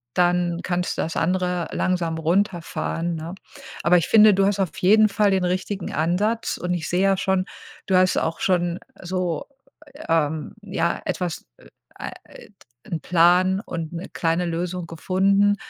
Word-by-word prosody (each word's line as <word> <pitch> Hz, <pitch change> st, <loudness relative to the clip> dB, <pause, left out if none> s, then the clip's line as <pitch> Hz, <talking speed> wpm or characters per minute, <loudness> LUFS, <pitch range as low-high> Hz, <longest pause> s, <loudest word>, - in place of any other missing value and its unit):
dann 175 Hz, -1 st, +1 dB
kannst 180 Hz, 0 st, -2 dB
du -, -, 0 dB
das 165 Hz, -, -4 dB
andere 180 Hz, 0 st, 0 dB
langsam 175 Hz, -3 st, -1 dB
runterfahren, 170 Hz, -1 st, -1 dB
ne? 165 Hz, +3 st, -6 dB, 0.5 s
Aber 180 Hz, +1 st, +5 dB
ich 170 Hz, -, 0 dB
finde, 215 Hz, -1 st, +7 dB
du 195 Hz, +1 st, +3 dB
hast 200 Hz, 0 st, 0 dB
auf 190 Hz, -4 st, -1 dB
jeden 215 Hz, +4 st, +5 dB
Fall 205 Hz, 0 st, +2 dB
den 190 Hz, -1 st, +1 dB
richtigen 185 Hz, +1 st, -3 dB
Ansatz 195 Hz, +9 st, 0 dB
und 180 Hz, +1 st, -2 dB
ich 165 Hz, -3 st, -3 dB
sehe 180 Hz, +1 st, +1 dB
ja 195 Hz, 0 st, +4 dB
schon, 190 Hz, -1 st, 0 dB, 0.4 s
du 190 Hz, -, +1 dB
hast 185 Hz, 0 st, +4 dB
auch 160 Hz, -, -1 dB
schon 175 Hz, -1 st, 0 dB, 0.2 s
so, 180 Hz, -2 st, -2 dB, 0.6 s
ähm 160 Hz, -2 st, 0 dB
ja, 200 Hz, -2 st, -1 dB
etwas, 175 Hz, -3 st, -3 dB
äh, -, -, -20 dB, 0.3 s
a -, -, -6 dB, 0.2 s
äh, -, -, -14 dB
d -, -, -28 dB, 0.4 s
'n 165 Hz, -, -1 dB
Plan 180 Hz, +2 st, +4 dB
und 165 Hz, -2 st, -5 dB
'ne 170 Hz, +2 st, -6 dB
kleine 165 Hz, +1 st, 0 dB
Lösung 175 Hz, +1 st, -3 dB
gefunden, 195 Hz, +4 st, +2 dB
180 Hz, 165 wpm, -23 LUFS, 170-190 Hz, 0.6 s, finde